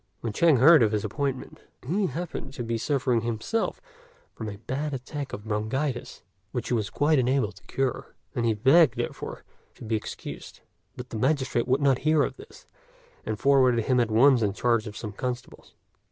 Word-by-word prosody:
When 115 -3 -3
Chang 160 +2 +4
heard 150 +4 +7
of 110 -2 +3
his 105 0 0
appointment, 135 +4 -4 0.3
he 190 +5 +1
happened 155 -2 -5
to 120 - -5
be 115 0 -2
suffering 130 -3 +1
himself 120 - -2 0.5
from 110 -2 -6
a 100 - -8
bad 140 +6 -3
attack 140 +2 -6
of 105 - -7
bronchitis, 120 +5 -3 0.3
which 120 -3 -4
he - - 0
was 110 -4 0
quite 150 0 +2
unable 130 -3 +1
to 95 -2 -18
cure, 135 -1 -2 0.2
and 120 - -1
he 115 -2 +2
begged, 135 +5 +5
therefore, - - -5 0.3
to - - -12
be 110 0 -1
excused; 110 - -7 0.4
but 125 0 -8
the 110 - -4
magistrate 130 -2 +1
would 130 +3 +2
not 135 -2 +3
hear 155 -1 +3
of - - -3
this, 410 +3 -14 0.6
and 110 - -2
forwarded 130 -3 +3
him 130 -1 +2
at 120 -2 +2
once 125 +3 +5
in 105 -3 +1
charge 115 0 +1
of 105 - -8
some 105 - -5
constables. 125 +4 -6
125 Hz, 185 wpm, -26 LUFS, 110-140 Hz, 0.6 s, heard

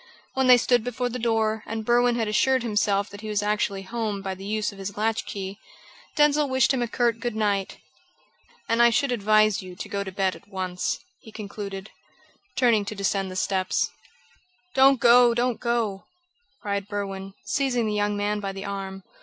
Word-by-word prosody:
When 265 -1 +1
they 250 -1 +9
stood 245 -1 +2
before 245 +1 -2
the 250 +1 -5
door, 220 -2 +1
and 220 0 -4
Berwin 240 +1 +3
had 225 -2 -1
assured 260 +4 +2
himself 205 -3 +1
that 205 0 -10
he 215 - -6
was 210 -1 0
actually 205 -2 -1
home 210 -1 -3
by 190 -1 -3
the 190 +1 -10
use 215 0 -1
of 200 - -14
his 195 +1 -6
latch 220 +1 0
key, 195 0 -6 0.6
Denzil 295 -1 +3
wished 260 0 +3
him 260 - 0
a 240 - 0
curt 235 -1 0
good 240 -1 -3
night. 205 -3 0 0.9
"And 230 +1 +2
I 235 - +7
should 270 +3 +1
advise 215 -2 +3
you 185 -1 -10
to - - -7
go 200 0 -2
to 190 - -7
bed 190 0 0
at - - -16
once," 185 -2 -2 0.2
he 220 - -14
concluded, 200 -2 -7 0.6
turning 235 -5 +3
to 215 - -5
descend 195 -1 -1
the 185 - -7
steps. 185 0 0 0.8
"Don't 270 0 +5
go! 240 0 +6
Don't 245 0 0
go!" 230 -5 -1 0.6
cried 200 -1 -2
Berwin, 195 -1 -5
seizing 260 -5 0
the 215 - -1
young 205 0 0
man 205 +1 -1
by 200 -1 -3
the 195 +1 -7
arm. 195 -1 -5
215 Hz, 190 wpm, -25 LUFS, 200-235 Hz, 0.9 s, they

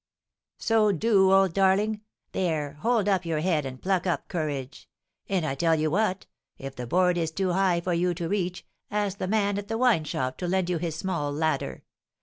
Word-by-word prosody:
'" - - -66
"So 220 -2 +3
do, 195 0 +3
old 195 -2 +4
darling! 200 +3 +2 0.3
There, 155 -6 -1
hold 225 +1 +1
up 190 -3 +2
your 165 -3 -1
head 160 -5 +1
and 130 -1 -8
pluck 190 -1 0
up 175 - -1
courage! 145 -5 -4 0.4
And 190 -5 0
I 135 - -1
tell 165 +4 +2
you 155 -1 0
what, 195 0 0 0.3
if 135 0 -7
the 125 -1 -6
board 180 +4 +2
is 165 -1 0
too 185 +3 -1
high 180 -2 +2
for 180 +1 -1
you 175 +1 +1
to 170 -1 -3
reach, 180 -1 -2 0.2
ask 205 -1 -2
the - - -2
man 205 -1 +1
at 205 - -8
the 225 +1 -2
wine 230 -10 +3
shop 130 -3 -3
to 180 - -2
lend 185 0 0
you 170 - 0
his 165 -2 -3
small 165 -4 -2
ladder. 145 - -2
180 Hz, 205 wpm, -26 LUFS, 160-195 Hz, 0.4 s, old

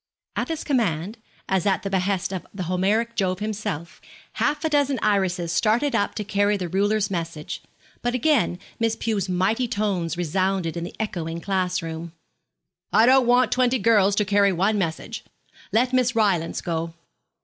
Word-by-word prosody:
At - - -1
this 325 -2 -3
command, 215 - -1 0.3
as 190 0 +1
at 195 - +1
the 195 - -2
behest 190 0 0
of 185 - -5
the 195 -2 -5
Homeric 200 +7 0
Jove 185 -4 0
himself, 200 -6 -4 0.3
half 300 +2 0
a - - +2
dozen 285 -2 +2
Irises 185 -5 +1
started 220 - +2
up 205 -2 0
to 210 - -2
carry 205 0 +1
the 180 -2 -3
ruler's 200 +3 +1
message; 165 -4 -4 0.4
but 245 +1 -1
again 255 - +2 0.2
Miss 225 -1 +1
Pew's 205 -4 -2
mighty 195 +7 +1
tones 195 -6 -1
resounded 180 0 0
in 170 - -3
the - - -9
echoing 170 -6 -3
class 180 -1 -1
room. 165 0 -6 0.8
'I 220 +2 +5
don't 260 0 +5
want 245 +1 +4
twenty 255 0 +3
girls 205 -4 +4
to 210 - +2
carry 200 0 +3
one 195 +4 +1
message. 165 -4 -3 0.5
Let 250 +3 +2
Miss 250 -2 +2
Rylance 195 -7 +1
go.' 165 -1 -3
200 Hz, 165 wpm, -24 LUFS, 180-225 Hz, 0.8 s, I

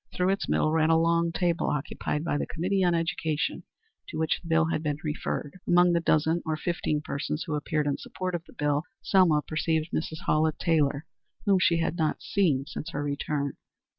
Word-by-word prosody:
Through 180 0 +1
its 195 +1 -1
middle 155 - +2
ran 160 0 +3
a 165 - +5
long 170 0 +2
table 170 -1 0
occupied 150 +1 -2
by 145 -3 0
the - - -2
Committee 185 +4 0
on 175 -1 +3
Education 165 -1 -1 0.5
to 155 - -6
which 160 0 0
the 170 - -11
bill 165 -1 +3
had 155 - 0
been 150 -2 -1
referred. 150 +1 -3
Among 175 0 +5
the 170 - +3
dozen 160 +1 +2
or 155 -1 -2
fifteen 155 -3 -1
persons 150 +1 -3
who 160 - -3
appeared 150 0 -1
in 145 -1 0
support 185 -1 -4
of 170 -1 -3
the - - -17
bill 145 0 +1 0.2
Selma 170 -6 +4
perceived 160 0 -1
Mrs. 160 0 -3
Hallett 155 0 +2
Taylor, 150 -2 +1 0.4
whom 195 -2 +4
she 170 -2 +3
had 165 0 -1
not 155 -3 0
seen 155 -9 +1
since 150 +2 -6
her 145 -3 -3
return. 140 0 -2
160 Hz, 195 wpm, -27 LUFS, 150-170 Hz, 0.5 s, a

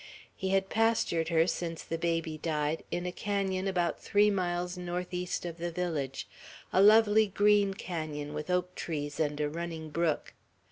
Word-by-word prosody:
He 190 - -3
had 195 0 +2
pastured 220 -7 +1
her, 165 -1 +4
since 170 -2 -3
the 165 - -4
baby 165 -2 -1
died, 155 0 -1
in 175 +1 -2
a 180 - -2
canon 195 -1 -1
about 175 -3 0
three 205 +1 +4
miles 180 -2 -1
northeast 180 0 -3
of 170 -1 -6
the 175 +1 -2
village, 160 -6 -3 0.5
a 190 - +5
lovely 215 +1 +6
green 205 0 +3
canon 155 -6 -4
with 150 +2 -5
oak 180 0 0
trees 145 -4 -4
and 150 -2 0
a 150 - +1
running 160 0 -5
brook. 165 -1 0
175 Hz, 160 wpm, -30 LUFS, 160-190 Hz, 0.5 s, lovely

